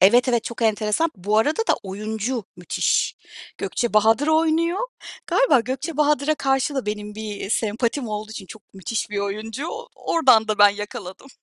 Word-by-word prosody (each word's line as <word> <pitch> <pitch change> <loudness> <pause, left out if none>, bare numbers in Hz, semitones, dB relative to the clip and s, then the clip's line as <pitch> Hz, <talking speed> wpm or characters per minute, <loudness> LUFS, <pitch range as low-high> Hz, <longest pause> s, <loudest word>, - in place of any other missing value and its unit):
evet, 240 +7 +6
evet 235 -2 +1
çok 235 0 -5
enteresan. 220 +8 +1
Bu 205 +4 +1
arada 300 - +2
da - - +5
oyuncu 215 +4 -3
müthiş. 180 - 0 0.4
Gökçe 240 -2 -2
Bahadır 225 +6 +4
oynuyor. 325 +3 +2 0.5
Galiba - - +4
Gökçe 270 +6 -4
Bahadır'a 300 0 +2
karşı 270 0 0
da 265 -5 -2
benim 210 0 -4
bir 210 -2 -6
sempatim 230 +4 -1
olduğu 215 0 -4
için 210 -3 -8
çok 220 +2 -12
müthiş 205 +3 -3
bir 205 - -2
oyuncu, 215 +8 -4 0.3
oradan 255 - +3
da 215 - 0
ben 205 0 +9
yakaladım. 205 +3 -7
225 Hz, 160 wpm, -23 LUFS, 210-270 Hz, 0.5 s, ben